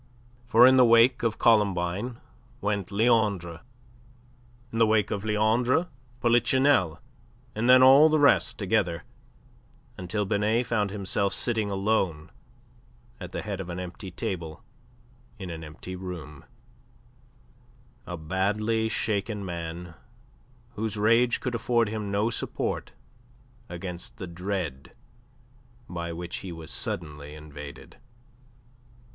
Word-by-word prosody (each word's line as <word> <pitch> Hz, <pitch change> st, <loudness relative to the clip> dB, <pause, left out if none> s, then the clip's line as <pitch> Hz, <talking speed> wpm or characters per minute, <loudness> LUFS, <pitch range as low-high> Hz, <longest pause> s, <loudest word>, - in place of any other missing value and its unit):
For 120 Hz, 0 st, +7 dB
in 130 Hz, +1 st, +6 dB
the 130 Hz, -, +7 dB
wake 115 Hz, +2 st, +5 dB
of 115 Hz, -2 st, 0 dB
Columbine 105 Hz, +1 st, +1 dB, 0.4 s
went 100 Hz, -2 st, -2 dB
Leandre, 100 Hz, -6 st, +1 dB, 1.1 s
in 115 Hz, -, -3 dB
the 115 Hz, -, +5 dB
wake 110 Hz, -1 st, +2 dB
of 100 Hz, -1 st, -2 dB
Leandre, 115 Hz, +9 st, +2 dB, 0.3 s
Polichinelle 120 Hz, -, +3 dB, 0.5 s
and 115 Hz, +3 st, 0 dB
then 130 Hz, 0 st, +8 dB
all 140 Hz, +4 st, +8 dB
the 155 Hz, -, +3 dB
rest 145 Hz, -1 st, +3 dB
together, 85 Hz, -2 st, 0 dB, 1.0 s
until 100 Hz, +3 st, -2 dB
Binet 105 Hz, +5 st, +1 dB
found 105 Hz, -4 st, 0 dB
himself 100 Hz, 0 st, -1 dB
sitting 110 Hz, -1 st, 0 dB
alone 95 Hz, -6 st, -1 dB, 0.9 s
at 90 Hz, -2 st, -8 dB
the -, -, -4 dB
head 100 Hz, -2 st, -4 dB
of 90 Hz, -, -8 dB
an 85 Hz, +1 st, -5 dB
empty 90 Hz, +2 st, -7 dB
table 85 Hz, -3 st, -5 dB, 0.7 s
in 95 Hz, -4 st, -7 dB
an 80 Hz, -1 st, -7 dB
empty 80 Hz, +4 st, -8 dB
room 85 Hz, -6 st, -8 dB, 1.6 s
a 90 Hz, -, -5 dB
badly 105 Hz, +7 st, 0 dB
shaken 105 Hz, -1 st, -2 dB
man 85 Hz, 0 st, -6 dB, 0.8 s
whose 110 Hz, 0 st, -3 dB
rage 115 Hz, +3 st, +3 dB
could 125 Hz, -, -3 dB
afford 120 Hz, -1 st, +1 dB
him 105 Hz, -2 st, -4 dB
no 105 Hz, +3 st, 0 dB
support -, -, -3 dB, 0.8 s
against 90 Hz, 0 st, -7 dB
the 95 Hz, -, -6 dB
dread 85 Hz, -, -5 dB, 0.9 s
by 85 Hz, -1 st, -5 dB
which 85 Hz, +1 st, -5 dB
he 95 Hz, -, -7 dB
was 80 Hz, -1 st, -8 dB
suddenly 75 Hz, -2 st, -4 dB
invaded. 75 Hz, -2 st, -11 dB
100 Hz, 115 wpm, -27 LUFS, 85-115 Hz, 1.6 s, then